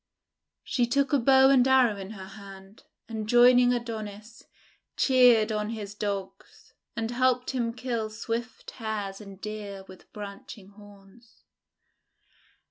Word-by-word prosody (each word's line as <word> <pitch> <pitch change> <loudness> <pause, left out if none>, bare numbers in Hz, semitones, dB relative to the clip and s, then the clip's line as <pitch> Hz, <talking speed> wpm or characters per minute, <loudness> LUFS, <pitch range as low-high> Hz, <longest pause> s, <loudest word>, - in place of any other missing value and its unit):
She 245 -2 0
took 275 +2 0
a 285 - +4
bow 265 +2 +5
and 260 -2 +4
arrow 260 -5 +4
in 195 -1 -8
her 190 -3 -9
hand, 195 0 -13 0.2
and 220 -2 -6
joining 245 +1 +6
Adonis, 220 -2 -6 0.6
cheered 245 -4 +4
on 210 0 -2
his 210 -3 -6
Dogs, 200 -2 -6 0.2
and 230 0 -3
helped 250 0 +1
him 240 -3 -1
kill 235 -2 -3
swift 230 +2 -5
Hares 215 -4 -5
and 195 -2 -12
Deer 205 -2 -7
with 185 - -16
branching 200 -1 -10
horns. 205 +2 -19
220 Hz, 125 wpm, -27 LUFS, 205-245 Hz, 0.6 s, joining